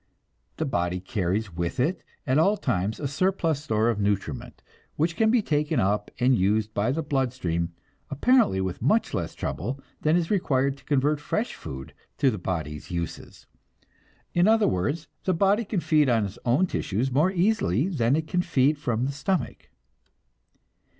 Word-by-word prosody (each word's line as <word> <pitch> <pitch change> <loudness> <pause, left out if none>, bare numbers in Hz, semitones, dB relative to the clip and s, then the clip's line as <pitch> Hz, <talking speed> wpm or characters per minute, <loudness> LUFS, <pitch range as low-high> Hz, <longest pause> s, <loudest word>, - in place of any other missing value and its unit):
The - - -1
body 90 +1 -1
carries 95 +1 -2
with 85 +4 -3
it 160 +9 +1 0.2
at 135 +2 +2
all 200 +6 +3
times 105 - -1
a 145 - -2
surplus 160 -1 0
store 110 -6 +1
of 115 -3 +1
nutriment, 100 -9 -2 0.3
which 165 +3 0
can 220 +2 +3
be 230 -1 +3
taken 150 -2 0
up 105 +2 0
and 125 +1 +4
used 105 +2 +1
by 110 +5 +1
the 160 +4 -1
blood 135 -3 0
stream, 85 -7 -2 0.4
apparently 155 - +3
with 95 -1 -3
much - - +2
less - - -3
trouble 125 - -4 0.2
than 155 +2 +3
is 170 +1 -1
required 140 -8 +1
to 140 - -20
convert 145 +1 +1
fresh 215 +10 -2
food 65 -4 -8 0.2
to 135 -2 +3
the 105 - -5
body's 80 -5 -4
uses. 85 -2 -6 0.9
In 175 +2 +4
other 225 0 +4
words, 115 - -1 0.2
the 185 - +2
body 200 +5 +3
can 200 -4 -2
feed 150 -4 +3
on 115 -3 +2
its 100 +4 -8
own 130 +10 +3
tissues 125 - -2
more 150 +8 +3
easily 175 - +1
than 135 -8 +1
it 160 0 -1
can 180 +2 0
feed 150 -4 +2
from 120 -4 -1
the 140 - -1
stomach. 145 +6 -3
135 Hz, 170 wpm, -26 LUFS, 100-165 Hz, 0.9 s, and